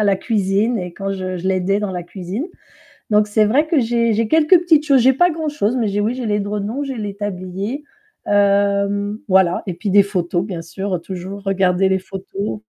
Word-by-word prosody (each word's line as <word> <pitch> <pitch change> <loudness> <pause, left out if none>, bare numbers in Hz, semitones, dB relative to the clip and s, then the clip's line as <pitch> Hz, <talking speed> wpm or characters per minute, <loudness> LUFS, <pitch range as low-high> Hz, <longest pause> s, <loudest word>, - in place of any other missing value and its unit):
à - - +2
la 200 -2 +3
cuisine 210 +2 0
et 180 -2 -5
quand 195 +2 -4
je 185 -1 -4
je 180 +1 -5
l'aidais 190 +1 +1
dans 205 -2 -2
la 180 -1 -4
cuisine. 185 - -5 0.6
Donc 210 0 +4
c'est 215 +1 +2
vrai 265 +9 +2
que 315 -2 +2
j'ai 235 -1 +1
j'ai 220 +1 0
quelques 320 +3 +5
petites 320 -4 +3
choses, 275 -3 +5
j'ai 260 +3 +5
pas 350 +7 +3
grand-chose, 295 -8 -1
mais 230 -4 0
j'ai 200 +1 -1
oui 220 +4 0
j'ai 255 -2 -4
les 205 -1 0
journaux, 210 +7 -3
j'ai 270 -3 -5
les 205 -2 -4
tabliers, 200 +5 -4 0.4
hem, 200 0 +1
voilà 185 -2 +3
et 185 - -3
puis 195 +4 -4
des 200 +1 +6
photos 180 -2 -1
bien 180 -5 -5
sûr 185 +2 -4
toujours 190 +3 -7
garder 190 0 +2
les 190 0 +2
photos 190 - -6
200 Hz, 205 wpm, -19 LUFS, 190-230 Hz, 0.6 s, des